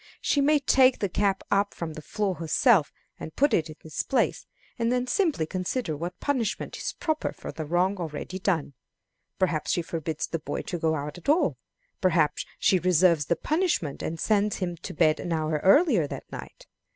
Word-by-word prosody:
She 285 - +1
may 300 +2 +4
take 260 -2 +4
the 200 - -1
cap 195 +1 0
up 200 0 +1
from 165 -2 -5
the 155 - -8
floor 200 +4 -2
herself 165 - +3 0.3
and 155 - -8
put 285 +1 +3
it 160 -1 +1
in 155 - -9
its 160 - -3
place, 270 - 0 0.3
and 230 0 +1
then 250 0 +1
simply 315 - +1
consider 185 +1 -2
what 175 +4 -6
punishment 250 -7 -2
is - - -4
proper 315 -2 -2
for - - -8
the 155 -2 -6
wrong 180 +4 +1
already 170 +2 -5
done. 170 -7 -1 0.6
Perhaps 165 -5 0
she 175 - +1
forbids 160 -2 -3
the 165 - -4
boy 150 - -4
to 175 - -4
go 160 0 +1
out 150 +3 -5
at 175 - -6
all. 315 +4 +3 0.5
Perhaps 165 -5 +2
she 185 - +3
reserves 175 -4 +3
the 170 - +2
punishment, 310 - -1
and 165 0 -4
sends 210 +1 +2
him 175 -2 -3
to - - -8
bed 155 -1 +3
an 175 - -4
hour 155 -2 0
earlier 205 - +5
that - - -8
night. - - -9
180 Hz, 190 wpm, -26 LUFS, 160-230 Hz, 0.6 s, earlier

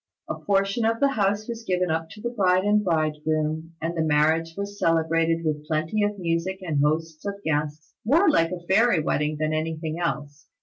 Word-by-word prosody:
A - - -2
portion 195 +3 0
of 225 +1 +1
the 280 - +4
house 210 -4 0
was 230 -1 -6
given 180 -4 0
up 160 0 -2
to 210 - -12
the 240 +1 -3
bride 185 -5 +2
and 210 +1 +3
bridegroom, 155 -1 -1
and 165 +2 -3
the 165 - 0
marriage 160 +2 +2
was 200 0 -5
celebrated 165 0 +1
with 150 -1 -2
plenty 160 +7 0
of 205 0 0
music 170 +1 -1
and 155 -5 0
hosts 155 +1 -1
of 200 -1 -3
guests, 150 0 -2
more 320 - +4
like 165 - +3
a 175 -1 -6
fairy 210 -1 +4
wedding 150 0 0
than 155 0 0
anything 160 +1 -3
else. 145 -4 -4
165 Hz, 190 wpm, -25 LUFS, 155-200 Hz, -, the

